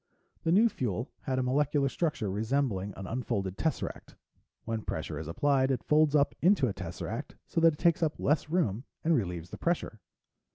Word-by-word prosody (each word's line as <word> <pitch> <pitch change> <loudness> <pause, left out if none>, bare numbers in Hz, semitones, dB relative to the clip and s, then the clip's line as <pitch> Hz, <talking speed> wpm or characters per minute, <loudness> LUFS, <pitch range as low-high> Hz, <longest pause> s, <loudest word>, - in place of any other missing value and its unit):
The 165 - 0
new 210 +6 +6
fuel 120 - -3
had 130 -2 0
a 130 - +1
molecular 140 +2 +2
structure 135 - -1
resembling 110 -2 0
an 95 - -6
unfolded 100 -4 -2
tesseract. 160 +8 -3 0.5
When 115 -1 -2
pressure 80 -5 -4
is 80 - -6
applied, 135 - +2
it 130 -3 0
folds 150 0 +4
up 145 -1 +3
into 175 -6 +4
a 105 - -2
tesseract 95 - -6
so 165 - -1
that 165 -1 +6
it - - -10
takes 170 0 +3
up 160 -2 0
less 150 +1 +1
room 135 - 0 0.2
and 165 - +3
relieves 90 - -2
the - - -8
pressure. 170 -10 -1
130 Hz, 180 wpm, -30 LUFS, 100-155 Hz, 0.5 s, new